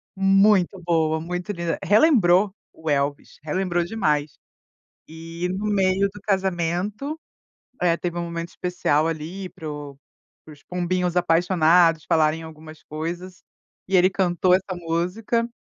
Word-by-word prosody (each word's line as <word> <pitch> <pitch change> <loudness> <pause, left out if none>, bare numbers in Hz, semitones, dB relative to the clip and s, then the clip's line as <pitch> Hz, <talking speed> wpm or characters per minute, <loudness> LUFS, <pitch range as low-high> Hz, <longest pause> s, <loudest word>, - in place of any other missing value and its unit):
muito 195 0 +3
boa, 160 -2 +1
muito 180 +3 -4
linda, 170 -3 -2
relembrou 205 - +4 0.2
o 160 -1 -6
Elvis, 140 0 -2
relembrou 175 +2 -1
demais. 155 -7 -1 0.7
E 165 +2 -6
no 210 - -4
meio 195 -1 +2
do 205 - -12
casamento, 195 - -1 0.6
eh, 175 -2 +3
teve 175 -1 -4
um - - -2
momento 170 0 -5
especial, 165 -4 0
ali, 165 +4 -5
para 155 -3 -8
o 145 -2 -8 0.5
para 155 - -12
os 145 - -19
pombinhos 180 0 -1
apaixonados 170 -1 +3
falarem 160 0 +2
algumas 155 -1 -12
coisas, 175 +4 -6 0.5
e 190 - 0
ele 185 0 +5
cantou 180 -1 +1
essa 185 0 0
música, 180 +8 -1
175 Hz, 130 wpm, -23 LUFS, 160-190 Hz, 0.7 s, ele